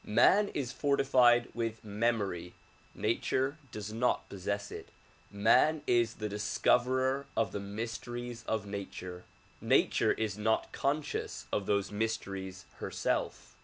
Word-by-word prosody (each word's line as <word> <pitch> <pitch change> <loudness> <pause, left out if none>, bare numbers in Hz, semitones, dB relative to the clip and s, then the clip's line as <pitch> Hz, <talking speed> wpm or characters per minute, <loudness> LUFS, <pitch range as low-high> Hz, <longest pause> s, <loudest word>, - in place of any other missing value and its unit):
IMan 200 - +5
is 135 -3 -2
fortified 130 -4 +4
with 115 -2 -3
memory; 105 -5 -1 0.4
nature 130 +7 0
does 105 0 -6
not 125 +2 +1
possess 100 +1 -3
it. - - -8 0.4
]\Ian 145 +9 +4
is 120 -2 +2
the 105 - -3
discoverer 125 +6 +1
of - - +2
the - - -3
mysteries 115 +3 -5
of 110 -2 -1
nature; 95 -3 -6 0.4
nature - - +3
is 105 -2 -3
not 110 +1 +1
conscious 150 +2 -2
of 100 - 0
those 100 -1 +1
mysteries 100 -4 -3
herself. - - -2
110 Hz, 120 wpm, -32 LUFS, 100-125 Hz, 0.4 s, IMan